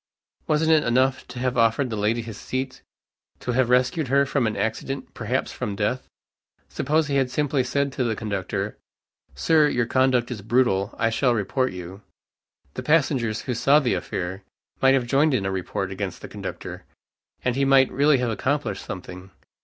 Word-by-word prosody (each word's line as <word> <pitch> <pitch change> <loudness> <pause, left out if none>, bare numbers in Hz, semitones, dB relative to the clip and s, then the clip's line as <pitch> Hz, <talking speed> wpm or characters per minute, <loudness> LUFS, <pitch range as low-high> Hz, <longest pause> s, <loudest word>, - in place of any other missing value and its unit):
Wasn't 160 +1 +2
it 155 -2 +5
enough 130 +2 +1
to 125 - -10
have 125 0 -1
offered 115 +3 +2
the - - -2
lady 110 +3 0
his 115 -2 -8
seat, 130 0 -4 0.6
to 125 - -3
have 125 0 +2
rescued 125 +4 +2
her 140 +2 +3
from 135 -4 0
an 110 - -3
accident, 135 +5 -3
perhaps - - -2
from 100 - -4
death? 105 +5 -1 0.6
Suppose 155 +3 +1
he 140 -2 0
had 135 -2 +1
simply 140 0 0
said 140 +2 0
to 130 - -1
the 115 -2 0
conductor, 100 -1 -3 0.6
"Sir, 155 -2 +4
your 125 -4 +1
conduct 130 -1 +2
is 110 -5 -5
brutal, 110 -3 +1
I 115 0 +1
shall 120 +1 +2
report 115 +5 0
you." 90 +2 -8 0.7
The - - -5
passengers, 135 -8 +1
who 125 - -3
saw 140 +5 +4
the 130 -5 0
affair, 95 +3 -4 0.4
might 135 0 +6
have 130 -2 +1
joined 140 +3 +3
in 100 - -1
a 95 - -1
report 95 0 -3
against 95 -1 -5
the - - -6
conductor, - - -7 0.6
and 125 -1 +1
he 140 - +1
might 135 -1 +5
really 145 +1 +4
have 125 -2 -1
accomplished 130 -3 -1
something. 90 +1 -8
125 Hz, 180 wpm, -24 LUFS, 110-135 Hz, 0.7 s, might